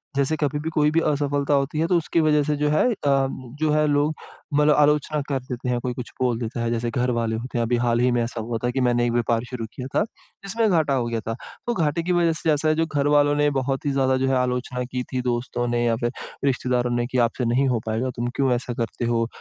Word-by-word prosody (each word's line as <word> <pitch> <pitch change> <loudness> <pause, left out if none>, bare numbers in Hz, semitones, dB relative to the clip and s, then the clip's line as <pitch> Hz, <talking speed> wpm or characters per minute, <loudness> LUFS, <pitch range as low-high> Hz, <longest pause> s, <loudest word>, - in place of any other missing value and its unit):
जैसे 140 +3 +1
कभी 145 0 -1
भी 160 - -2
कोई 150 -1 +3
भी 165 - +3
असफलता 145 0 0
होती 140 +2 +1
है 160 - +2
तो 180 - +2
उसके 165 0 0
वज़ह 150 -1 +3
से 150 - +1
जो 150 +1 0
है 150 - +3
अ, - - -1
जो 135 +1 0
है 150 0 +3
लोग 145 +1 +2 0.4
मतलब 150 0 +4
आलोचना 150 0 +2
कर 135 -2 0
देते 125 0 -5
हैं 125 -1 +1
कोई 125 - -2
कुछ 120 -1 -7
बोल 125 -3 +2
देता 115 0 -4
है। 115 - 0
जैसे 120 0 -1
घर 125 +1 0
वाले 115 -2 -1
होते 120 +2 -5
हैं 120 - +2
अभी 120 - +1
हाल 120 0 +2
ही 125 +1 +3
में 120 0 +1
ऐसा 115 -1 -4
हुआ 115 +1 -3
था 120 - +1
कि 130 +1 -1
मैंने 120 0 +2
एक 120 - 0
व्यापार 115 -1 +1
शुरू 120 -3 -4
किया 130 0 -6
था, - - +4 0.4
जिसमें 220 +3 +1
घाटा 160 -6 +2
हो 125 -3 +1
गया 115 -1 -2
था। 115 +2 -3 0.3
तो 240 - +1
घाटे 165 -4 0
की 180 - -1
वज़ह 170 -2 +3
से 160 - +2
ऐसा 150 +1 0
है 155 - +3
जो 165 +1 +1
घर 145 -3 0
वालों 145 0 +4
ने 145 0 +3
बहुत 135 +1 -2
ही 145 - +1
ज़्यादा 130 -1 +2
जो 135 0 0
है, 135 - +2
आलोचना 125 0 -1
की 125 0 -4
थी 130 - 0
दोस्तों 120 0 -2
ने 120 0 0
या 115 -1 +2
फिर 120 - +1 0.3
रिश्तेदारों 125 -2 +1
ने 120 0 0
की 130 - 0
आपसे 120 +2 -3
नहीं 125 +4 +2
हो 125 -3 +1
पाएगा। 115 +4 -1
तुम 120 +1 -2
क्यों 135 -2 +2
ऐसा 120 0 -3
करते 115 0 -3
हो? 115 -1 +1
130 Hz, 270 wpm, -23 LUFS, 120-150 Hz, 0.4 s, मतलब